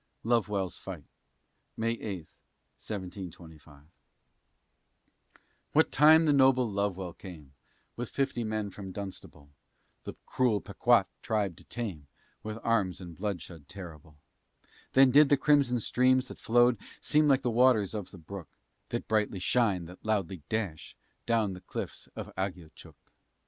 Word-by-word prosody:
LOVEWELL'S 105 -6 0
FIGHT - - -8 0.7
[May 115 +1 0
8, 100 -8 -5 0.5
1725] 85 -7 -8 1.9
What - - +4
time 155 +3 +7
the 150 - +4
noble 130 -2 +5
Lovewell 100 -3 -2
came, 80 -8 -11 0.4
With 120 -1 -5
fifty 135 -3 -1
men 110 -2 -2
from 95 -1 -8
Dunstable, 95 -7 -9 0.5
The - - -6
cruel 120 -5 +1
Pequa'tt - - +3 0.2
tribe 105 -5 -1
to - - -16
tame, 95 -12 -5 0.3
With 110 0 -5
arms 100 -6 +1
and 90 -3 -9
bloodshed 90 -6 -5
terrible, 80 -6 -11 0.8
Then 135 -1 +7
did 145 +2 +7
the 145 - +5
crimson 140 -4 +3
streams, 130 +3 +2
that - - -10
flowed, 120 -1 +4 0.2
Seem 150 0 +3
like 135 -1 +3
the 120 - +1
waters 115 -4 +4
of 105 -4 -5
the - - -12
brook, 85 -1 -9 0.4
That - - -3
brightly 105 -2 +1
shine, 95 -2 +1
that 90 +2 -13
loudly 100 -5 -1
dash 100 -8 -3
Far - - -43
down 110 -4 +2
the 90 - -9
cliffs 90 - -6
of - - -7
Agiochook. 90 -4 -6
105 Hz, 135 wpm, -30 LUFS, 90-120 Hz, 1.9 s, time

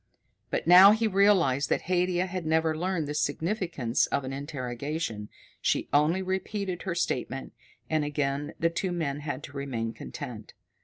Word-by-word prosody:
But - - -2
now 185 +4 +9
he 225 +1 0
realized 190 -10 +3
that - - +1
Haidia 180 0 +1
had 185 -1 -4
never 160 0 +1
learned 175 -2 -1
the 150 - -3
significance 155 - 0
of 140 - -1
an 130 +1 -5
interrogation. 135 -4 -4 0.3
She - - 0
only 155 +6 +3
repeated 190 0 -3
her 185 -3 -3
statement, 135 -5 -2 0.3
and 155 -1 +1
again 145 -1 -2
the 165 0 +2
two 185 +2 -2
men 150 -5 -2
had 145 -1 -5
to 145 - -8
remain 125 -5 -3
content. - - -8
160 Hz, 155 wpm, -28 LUFS, 140-185 Hz, 0.3 s, now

